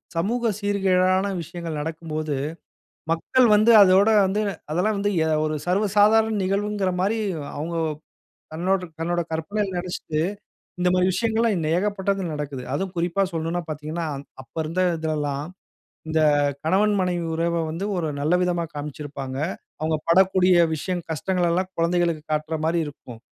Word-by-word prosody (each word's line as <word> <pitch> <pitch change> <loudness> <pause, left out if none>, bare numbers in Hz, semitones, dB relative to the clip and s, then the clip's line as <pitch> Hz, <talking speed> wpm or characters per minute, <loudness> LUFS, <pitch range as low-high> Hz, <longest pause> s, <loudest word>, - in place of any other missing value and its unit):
சமூக 230 +8 0
சீர்கேடான 190 -2 +2
விஷயங்கள் 170 -1 -6
நடக்கும்போது 155 -1 -3 0.8
மக்கள் 240 +10 +3
வந்து 215 +3 +5
அதோட 195 +2 +6 0.2
வந்து 195 +3 0 0.3
அதெல்லாம் 185 +7 +1
வந்து 200 +1 0 0.2
அ - - 0 0.2
ஒரு 155 0 -1
சர்வ 190 +4 +2
சாதாரண 220 +2 +5
நிகழ்வுங்கிறமாரி 200 +1 0 0.4
அவுங்க 165 +3 -4 0.8
தன்னோட, 185 +4 +1 0.2
தன்னோட 175 +1 0
கற்பனையில 190 +5 -2
நினைச்சுட்டு 175 -3 -3 0.6
இந்தமாரி 180 0 +3
விஷயங்கள்லாம் 225 -5 +1
ஏகப்பட்டது 195 0 -1
நடக்குது. 145 -3 -5
அதுவும் 185 +5 -2
குறிப்பா 175 +3 0
சொல்லணுன்னா 165 +1 -2
பார்த்தீங்கன்னா, 155 +2 -4
அந் 140 +1 -8 0.2
அப்ப 130 - -22
இருந்த 165 +4 -1 0.2
இதிலல்லாம், 150 -3 -2 0.6
இந்த 160 0 +1 0.4
கணவன், 205 +6 +3
மனைவி 180 -2 0
உறவ 170 0 0
வந்து 170 +5 -3
ஒரு 165 -3 -1
நல்ல 155 +5 +2
விதமா 175 -1 0
காமிச்சியிருப்பாங்க. 145 -2 -6 0.4
அவுங்க 155 0 +1
படக்கூடிய 185 +1 +5 0.2
விஷயம் 175 +3 -3
கஷ்டங்கள் 175 +2 0
எல்லாம் 185 +2 0
குழந்தைகளுக்கு 170 -1 +1
காட்றமாரி 160 +2 0
இருக்கும். 125 -5 -11
175 Hz, 125 wpm, -24 LUFS, 160-195 Hz, 0.8 s, அதோட